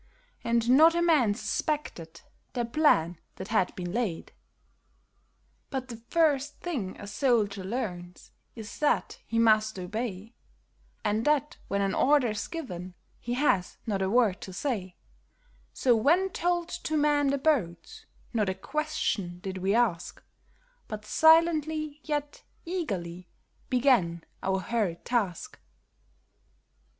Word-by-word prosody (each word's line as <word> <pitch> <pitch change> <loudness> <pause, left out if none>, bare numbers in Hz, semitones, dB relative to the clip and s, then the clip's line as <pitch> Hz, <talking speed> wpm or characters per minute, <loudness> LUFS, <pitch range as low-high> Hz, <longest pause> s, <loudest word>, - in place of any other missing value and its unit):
And 235 0 +1
not 320 +5 +7
a 340 - +2
man 280 -12 +3
suspected 180 - -3 0.3
the 240 -2 -1
plan 230 - +2 0.2
that 190 - -8
had 215 -4 +1
been 175 -1 -5
laid. 215 -6 -2 1.4
But 260 -2 -4
the 230 - -7
first 295 -4 +2
thing 255 - -4
a - - -8
soldier 205 -4 +1
learns 180 -5 -5 0.2
is 220 -3 -9
that 300 - +1
he 230 - -2
must 215 -2 +3
obey, 210 +3 -5 0.7
And 210 +2 +1
that 295 0 +1
when 200 0 0
an 195 -1 0
order's 255 -7 +2
given 185 - -7 0.2
he 240 +1 -3
has 225 -10 +1
not 200 -4 -1
a 190 - +1
word 220 -4 +2
to 190 - -7
say; 190 -3 -3 0.8
So 245 -3 +3
when 335 +12 +3
told 345 0 -1
to 315 -3 -2
man 295 -1 +3
the 280 +1 +1
boats, 285 - -1 0.3
not 210 -4 +1
a 190 - -2
question 250 - -2
did 190 0 -5
we 195 +3 +1
ask, 210 -8 0 0.6
But 210 0 -7
silently, 315 0 +3
yet 295 -2 -3 0.2
eagerly, 185 - -4 0.4
began 235 -11 +2 0.2
our 190 0 0
hurried 205 -6 -2
task. 210 -9 -2
230 Hz, 125 wpm, -28 LUFS, 190-295 Hz, 1.4 s, not